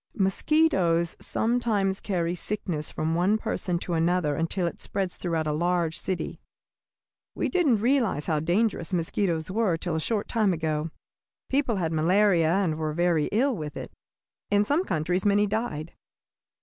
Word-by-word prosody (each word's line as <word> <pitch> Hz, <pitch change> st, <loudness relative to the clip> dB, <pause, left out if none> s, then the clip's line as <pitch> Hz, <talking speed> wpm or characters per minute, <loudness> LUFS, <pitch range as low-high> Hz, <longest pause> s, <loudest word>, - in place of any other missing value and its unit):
Mosquitoes 190 Hz, -, +2 dB
sometimes 220 Hz, -5 st, 0 dB
carry 175 Hz, -4 st, -1 dB
sickness 180 Hz, -4 st, -3 dB
from 155 Hz, +1 st, -2 dB
one 185 Hz, +6 st, +2 dB
person 180 Hz, -4 st, -2 dB
to 175 Hz, 0 st, -4 dB
another 165 Hz, -2 st, +1 dB
until 165 Hz, +3 st, -1 dB
it 170 Hz, -, -4 dB
spreads 190 Hz, -2 st, -2 dB
throughout 165 Hz, -3 st, -2 dB
a 155 Hz, -, 0 dB
large 170 Hz, +1 st, 0 dB
city. 185 Hz, -2 st, -4 dB, 0.9 s
We -, -, -1 dB
didn't 290 Hz, -, +2 dB
realize 235 Hz, -, +1 dB
how 155 Hz, -2 st, +1 dB
dangerous 180 Hz, +2 st, 0 dB
mosquitoes 165 Hz, -1 st, -1 dB
were 200 Hz, -5 st, +1 dB
till 170 Hz, 0 st, -3 dB
a -, -, 0 dB
short 210 Hz, +5 st, -1 dB
time 215 Hz, -5 st, +2 dB
ago. 155 Hz, -1 st, -2 dB, 0.6 s
People 270 Hz, -4 st, +1 dB
had 165 Hz, -4 st, -1 dB
malaria, 170 Hz, 0 st, +3 dB
and 175 Hz, -4 st, +1 dB
were 155 Hz, -1 st, -2 dB
very 170 Hz, -2 st, +2 dB
ill 255 Hz, +5 st, +2 dB
with 150 Hz, -4 st, -6 dB
it. -, -, -7 dB, 0.6 s
In 205 Hz, 0 st, +3 dB
some 295 Hz, -, +1 dB
countries 175 Hz, +3 st, -1 dB
many 205 Hz, 0 st, +3 dB
died. 200 Hz, -7 st, -3 dB
180 Hz, 150 wpm, -26 LUFS, 165-210 Hz, 0.9 s, malaria